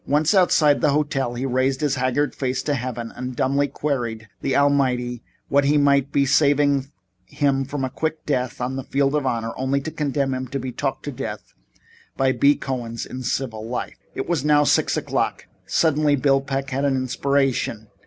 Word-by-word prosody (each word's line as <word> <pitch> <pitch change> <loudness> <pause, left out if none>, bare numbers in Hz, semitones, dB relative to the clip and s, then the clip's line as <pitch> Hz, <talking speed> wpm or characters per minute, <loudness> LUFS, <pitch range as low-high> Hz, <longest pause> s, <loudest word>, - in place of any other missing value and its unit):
Once 150 +5 +2
outside 160 -6 +4
the 150 - +4
hotel 135 -4 0
he 125 +3 -3
raised 130 +1 +1
his 145 -2 +1
haggard 130 +2 0
face 130 -1 -2
to 145 - 0
heaven 120 -3 -4
and 125 0 -5
dumbly 140 +3 +1
queried 125 -6 -3
of - - -19
the 135 - 0
Almighty 130 -4 +1 0.3
what 140 +1 +3
He 145 +2 +3
meant 140 -1 +3
by 140 - +3
saving 140 0 +3 0.4
him 135 +2 0
from 135 -1 -3
quick 155 +2 -3
death 125 -4 -1
on 125 +2 -2
the 135 - -4
field 140 +1 +1
of 145 -3 0
honor 115 -2 -1
only 130 +2 0
to 155 - -5
condemn 140 -3 -1
him 130 0 -3
to 135 +3 -4
be 130 0 -4
talked 135 +2 -3
to 145 - -4
death 125 - -6 0.6
by 135 0 +3
B. 140 +2 +4
Cohens 120 -4 -4
in 130 - -7
civil 120 -3 -3
life. 125 - -5 0.2
It - - -3
was 170 -6 0
now 150 0 +4
six - - +2
o'clock. - - -1 0.2
Suddenly 150 -2 +2
Peck 135 0 0
had 135 +2 -1
an 140 -1 +2
inspiration. 130 -3 0
135 Hz, 185 wpm, -22 LUFS, 130-145 Hz, 0.6 s, outside